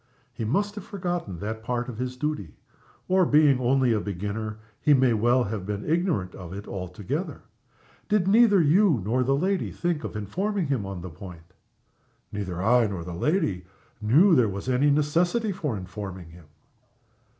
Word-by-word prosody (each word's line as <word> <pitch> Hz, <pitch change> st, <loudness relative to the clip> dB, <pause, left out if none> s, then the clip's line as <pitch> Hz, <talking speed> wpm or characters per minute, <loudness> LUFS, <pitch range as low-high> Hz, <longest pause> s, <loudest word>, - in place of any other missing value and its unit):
"He 115 Hz, -, -4 dB
must 200 Hz, -, 0 dB
have 205 Hz, -2 st, -7 dB
forgotten 175 Hz, -, -4 dB
that 110 Hz, +2 st, -4 dB
part 120 Hz, +1 st, -2 dB
of 120 Hz, -3 st, -7 dB
his 125 Hz, 0 st, -3 dB
duty 150 Hz, -, -3 dB, 0.5 s
or 185 Hz, 0 st, +4 dB
being 150 Hz, -5 st, +4 dB
only 130 Hz, -1 st, +2 dB
a 110 Hz, -, +1 dB
beginner, 105 Hz, +2 st, -4 dB, 0.2 s
he 150 Hz, -, +5 dB
may 130 Hz, -2 st, +3 dB
well 120 Hz, +3 st, +3 dB
have 105 Hz, -2 st, -4 dB
been 105 Hz, +1 st, -4 dB
ignorant 160 Hz, -, 0 dB
of 90 Hz, -2 st, -9 dB
it 100 Hz, +1 st, -7 dB
altogether. 90 Hz, +1 st, -5 dB, 0.7 s
Did 205 Hz, -3 st, +2 dB
neither 210 Hz, -1 st, +5 dB
you 170 Hz, -, +4 dB
nor 120 Hz, +5 st, +1 dB
the 135 Hz, +2 st, +2 dB
lady 185 Hz, +6 st, 0 dB
think 175 Hz, -4 st, -2 dB
of -, -, -6 dB
informing 185 Hz, -, -2 dB
him 130 Hz, -9 st, -1 dB
on 95 Hz, -2 st, -6 dB
the 90 Hz, -1 st, -7 dB
point?" 85 Hz, +1 st, -12 dB, 0.8 s
"Neither 95 Hz, -3 st, -4 dB
I 120 Hz, +1 st, +4 dB
nor 95 Hz, -4 st, -5 dB
the 90 Hz, +1 st, -7 dB
lady 95 Hz, -, 0 dB, 0.4 s
knew 150 Hz, -, +5 dB
there 125 Hz, -8 st, +4 dB
was 100 Hz, +4 st, -6 dB
any 130 Hz, +3 st, +3 dB
necessity 170 Hz, +10 st, +1 dB
for 150 Hz, -, -3 dB
informing 95 Hz, -2 st, -7 dB
him." 85 Hz, -1 st, -15 dB
125 Hz, 170 wpm, -26 LUFS, 100-165 Hz, 0.8 s, he